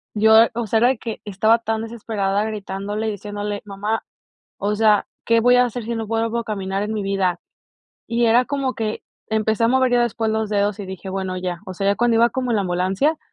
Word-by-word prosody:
yo, 220 +1 +5 0.2
o 235 -1 -1
sea, 225 - +2
era 240 - +5
de 260 - +1
que 225 0 -6
estaba 215 +3 +3
tan 225 -1 -2
desesperada 210 -3 -2
gritándole 205 0 -4
y - - -1
diciéndole: 205 0 -5
"Mamá, 205 +2 -3 0.5
o 205 +1 -1
sea, 210 -1 +3 0.2
¿qué 230 0 +4
voy 245 +2 +5
a 250 - +5
hacer 245 0 -4
si 235 +2 -3
no 225 -1 -3
vuelvo 225 +1 -1
a 235 - -4
caminar 195 -3 -3
en 215 +1 -3
mi 215 - -2
vida?" 195 -2 0 0.7
Y 235 +1 +1
era 235 +2 +5
como 275 -2 -1
que 220 -1 -3 0.3
empecé 220 +1 +1
a - - +5
mover 260 0 +3
ya 240 - +4
después 230 -1 -1
los 220 -1 -1
dedos 205 -1 +1
y 200 - -5
dije 190 0 -8
bueno 190 -1 -3
ya, 180 -1 -4
o 185 - -6
sea, 195 +2 -2
ya 200 - +3
cuando 235 +1 +2
iba 235 +1 +5
como 255 +1 -2
la 215 -3 +2
ambulancia, 190 - 0
220 Hz, 225 wpm, -21 LUFS, 200-230 Hz, 0.7 s, yo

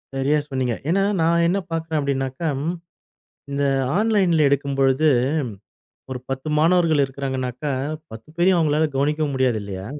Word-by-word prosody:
சரியா 140 +3 +2
சொன்னீங்க. 130 -3 -1
ஏன்னா 195 +3 +2 0.2
நான் 170 +1 +3
என்ன 190 +3 +1
பார்க்கிறேன் 160 -1 -1
அப்படின்னாக்கம் 140 +1 -2 0.9
இந்த 140 0 -1 0.3
ஆன்லைன்ல 190 -8 +3
எடுக்கும்பொழுது 140 +1 +2 1.0
ஒரு 130 - -3
10 135 +3 -4
மாணவர்கள் 165 -2 +3
இருக்கிறாங்கன்னாக்க 130 -1 -4 0.5
10 110 +5 -11
பேரையும் 180 0 +3
உங்களால 155 0 +2
கவனிக்க 150 +2 +1
முடியாது 130 -4 +1
இல்லையா? 95 -1 -6
140 Hz, 120 wpm, -22 LUFS, 135-165 Hz, 1.0 s, நான்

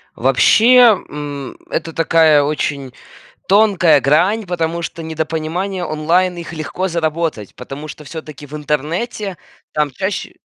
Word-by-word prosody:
Вообще, 215 - +5 0.3
м, 145 -2 -6
это 165 - -3
такая 160 -2 +4
очень 140 -3 -2 0.5
тонкая 190 -7 +4
грань, 180 +11 +2
потому 170 -1 -2
что 165 0 -6
недопонимания 160 +4 -3
онлайн, 170 +4 +1
их 170 0 -7
легко 170 +4 -3
заработать, 160 - -2
потому 135 +4 -8
что 150 - -10
всё-таки 150 -1 -9
в 145 - -12
интернете 165 - -3 0.4
там 150 -1 0
чаще 190 +9 -4
160 Hz, 120 wpm, -17 LUFS, 150-180 Hz, 0.5 s, Вообще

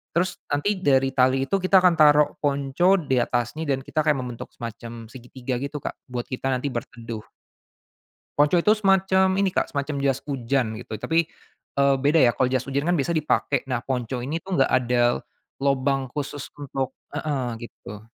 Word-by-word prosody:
terus 180 +2 0
nanti 185 +7 0
dari 135 -5 +3
tali 130 0 +3
itu 195 +4 +1
kita 185 0 +4
akan 180 -2 +5
taruh 150 -1 +6
ponco 145 +6 +2
di 135 -5 0
atasnya 120 +6 -1
dan 135 -1 0
kita 155 - -3
kayak 150 -2 +4
membentuk 125 -2 -6
semacam 115 0 -8
segitiga 130 0 -6
gitu, 140 +2 -4
Kak, - - -2 0.2
buat 125 -1 -4
kita 130 0 -4
nanti 130 +2 -2
berteduh. 115 -1 -6 1.2
Ponco 150 +4 +4
itu 190 +5 +4
semacam 190 -2 +3
ini, 195 -1 +1
Kak, - - 0
semacam 140 0 -2
jas 135 -1 0
hujan 130 -4 -1
gitu 110 -3 -6
tapi, 165 +8 0 0.5
eee, 140 0 +4
beda 150 +4 +4
ya 120 - +4
kalau 125 +4 +1
jas 130 -1 0
hujan 140 +3 -2
kan 175 - +3
biasa 150 +4 0
dipakai, 150 -4 +1
nah 125 -1 -2
ponco 125 -1 -3
ini 160 +5 -3
tuh 190 -1 -3
gak - - -2
ada, 120 -1 +2 0.4
lobang 135 -1 +1
khusus 145 0 -5
untuk 135 -2 -3 0.2
heeh, 145 -4 -2
gitu. 105 -3 -10
140 Hz, 175 wpm, -24 LUFS, 125-155 Hz, 1.2 s, taruh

